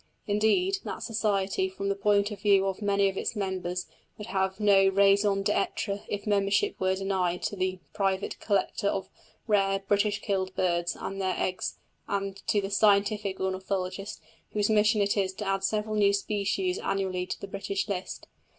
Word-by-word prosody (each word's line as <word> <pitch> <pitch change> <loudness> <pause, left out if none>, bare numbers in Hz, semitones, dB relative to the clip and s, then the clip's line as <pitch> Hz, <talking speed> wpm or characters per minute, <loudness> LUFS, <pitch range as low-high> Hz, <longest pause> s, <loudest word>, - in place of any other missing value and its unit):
Indeed, 230 - +2
that - - -5
Society, 200 -4 0
from 195 +1 -5
the 200 - +1
point 205 +1 +2
of 200 -2 -7
view 200 -2 +4
of 195 +1 -2
many 200 -1 +2
of 195 0 -3
its - - -2
members 185 -3 -2 0.3
would 210 - -7
have 190 0 -1
no 200 -2 +5
raison 200 +1 +4
d'être 205 0 -1
if 205 -1 -4
membership 205 - +2
were 190 0 +1
denied 190 -2 -1
to - - -2
the 185 0 -1 0.2
private 195 -1 -1
collector 200 0 0
of 195 - -1 0.4
rare 195 -2 +2
"British 205 +1 +2
killed" 190 -2 -2
birds 175 -1 0
and 195 0 -4
their 185 -1 0
eggs 185 0 -2 0.3
and 195 -1 -2
to 205 - +2
the 195 0 -4
"scientific" 205 -1 +2
ornithologist 190 +1 -3 0.3
whose 210 0 +1
mission 210 0 +4
is 200 -1 +1
to 210 - -5
add 195 0 0
several 215 +2 0
new 205 -1 +4
species 210 - -1
annually 190 - -1
to - - -4
the 200 - -7
British 195 0 -3
list. 190 -3 -4
200 Hz, 170 wpm, -28 LUFS, 190-205 Hz, 0.4 s, no